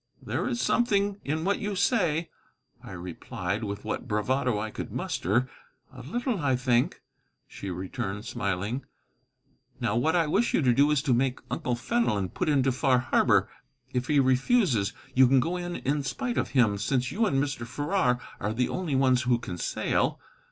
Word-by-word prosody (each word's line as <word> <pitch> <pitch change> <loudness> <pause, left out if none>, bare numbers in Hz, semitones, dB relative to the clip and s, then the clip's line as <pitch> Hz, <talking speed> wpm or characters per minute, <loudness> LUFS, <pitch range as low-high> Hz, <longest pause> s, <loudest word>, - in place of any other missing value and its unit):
"There - - -2
is 240 - -2
something 205 -5 +1
in 155 +3 -2
what 200 +1 +1
you 205 -2 -3
say," 175 -6 +1 0.5
I - - -9
replied, 90 +3 -4
with 100 -1 -5
what - - -3
bravado 120 +2 0
I 110 +1 -3
could - - -6
muster. 120 +9 0 0.5
"A - - -10
little, 240 - -2
I 140 -4 +2
think," 125 -1 +1 0.4
she 100 - -7
returned, 95 +3 -4
smiling; 105 +3 -2 1.0
"now, 120 -4 0
what 155 +8 +2
I 170 -2 +3
wish 200 +10 +1
you - - +2
to 125 -2 +4
do 140 +4 +4
is 150 -2 +2
to 135 -6 +2
make 130 +1 +1
Uncle 125 - -1
Fenelon 120 - 0
put 155 - -2
into 135 -3 +3
Far 130 0 +2
Harbor. 125 +1 +3 0.5
If 125 0 -1
he 150 -2 +3
refuses, 130 - +2 0.2
you 130 0 +6
can 135 +1 +5
go 170 +8 -1
in 175 -1 -4
in 145 +2 -1
spite 245 - -2
of - - -1
him, 105 -5 +4
since 125 +4 0
you 220 +2 +1
and 140 - +1
Mr. 135 -4 -1
Farrar 140 -1 0 0.2
are 105 +2 -2
the 125 +1 +1
only 170 -7 -2
ones 130 -1 +3
who 125 -1 +2
can 90 -7 -7
sail. - - 0
130 Hz, 180 wpm, -27 LUFS, 115-160 Hz, 1.0 s, you